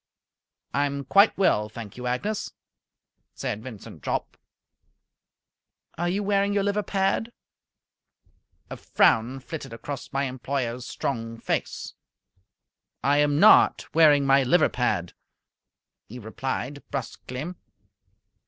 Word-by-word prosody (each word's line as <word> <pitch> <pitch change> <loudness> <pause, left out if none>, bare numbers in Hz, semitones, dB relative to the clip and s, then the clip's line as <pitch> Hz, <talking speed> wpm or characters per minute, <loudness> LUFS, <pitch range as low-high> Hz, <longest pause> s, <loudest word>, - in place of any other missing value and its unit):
"I 145 +2 +2
am 140 0 -4
quite 200 - +5
well, 105 - +2
thank 110 -2 -9
you, 125 0 -5
Agnes," 200 +13 -2 0.8
said 105 - -4
Vincent 115 -4 -10
Jopp. - - -3 1.6
"Are 175 +1 -1
you 200 +3 -1
wearing 200 0 +1
your 200 -1 +1
liver 205 +1 0
pad?" 195 +3 0 1.4
A - - -5
frown 120 +4 +2
flitted 140 -4 -7
across 135 +3 -7
my 140 0 0
employer's 125 -2 -3
strong 115 -3 -4
face. - - -3 1.1
"I 145 +1 +3
am 145 0 +2
not 215 +5 +5
wearing 150 -3 +5
my 135 0 +5
liver 155 +6 +3
pad," 90 -8 -1 0.9
he 120 - -9
replied, 130 +4 -4
brusquely. 140 +3 -5
140 Hz, 110 wpm, -25 LUFS, 125-175 Hz, 1.6 s, quite